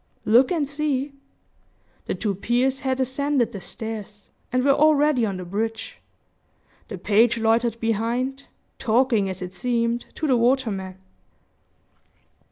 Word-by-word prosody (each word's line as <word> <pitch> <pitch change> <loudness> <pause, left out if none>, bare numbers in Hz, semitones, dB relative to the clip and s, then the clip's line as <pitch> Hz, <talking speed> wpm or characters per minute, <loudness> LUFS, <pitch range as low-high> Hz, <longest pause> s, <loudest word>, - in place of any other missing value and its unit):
"Look 245 +7 +5
and 315 -5 0
see!" 285 -1 -2 0.9
The - - -1
two 210 -3 -1
peers 245 +7 0
has 265 -1 -1
ascended 265 -1 0
the 200 -4 -7
stairs, 210 -1 -7 0.2
and 255 0 +1
were 280 - +6
already 295 -4 +3
on 195 -2 -3
the 180 - -7
bridge. 220 +4 -4 0.9
The 200 - -6
page 220 +6 +3
loitered 230 +1 +1
behind, 235 +5 -1 0.3
talking, 230 -3 +2
as 190 0 -5
it 180 0 -7
seemed, 235 0 -1
to 315 - -3
the 265 -4 +3
waterman. 225 -7 0
235 Hz, 130 wpm, -23 LUFS, 215-265 Hz, 0.9 s, were